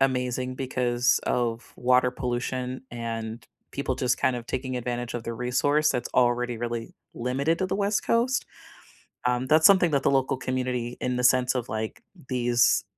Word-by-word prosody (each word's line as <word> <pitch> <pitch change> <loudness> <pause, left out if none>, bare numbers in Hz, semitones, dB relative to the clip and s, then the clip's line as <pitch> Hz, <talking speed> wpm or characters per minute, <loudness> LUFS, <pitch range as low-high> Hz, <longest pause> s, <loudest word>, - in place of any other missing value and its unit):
amazing 130 -1 0
because 125 -2 +1
of 120 -1 -1
water 125 0 +3
pollution 125 0 -3
and 115 -1 -5 0.3
people 140 -1 -2
just 125 -1 0
kind 130 - +2
of 120 -1 -5
taking 130 0 -3
advantage 120 0 -3
of 120 - -3
the 115 - -4
resource 135 +6 +1
that's 120 -1 -2
already 120 -1 +2
really 115 -1 -4 0.2
limited 135 +7 0
to 185 - 0
the - - -2
West 205 +1 +1
Coast, 245 +4 +1 0.8
um, 125 +1 +1
that's 155 +1 +6
something 185 -4 +6
that 140 -2 +1
the - - +3
local 135 -1 +1
community 125 -2 -2
in 125 0 -1
the 125 - -1
sense 125 +1 +4
of, 125 -2 -2
like, 110 0 -4 0.3
these 120 -1 +3
125 Hz, 165 wpm, -26 LUFS, 120-130 Hz, 0.8 s, that's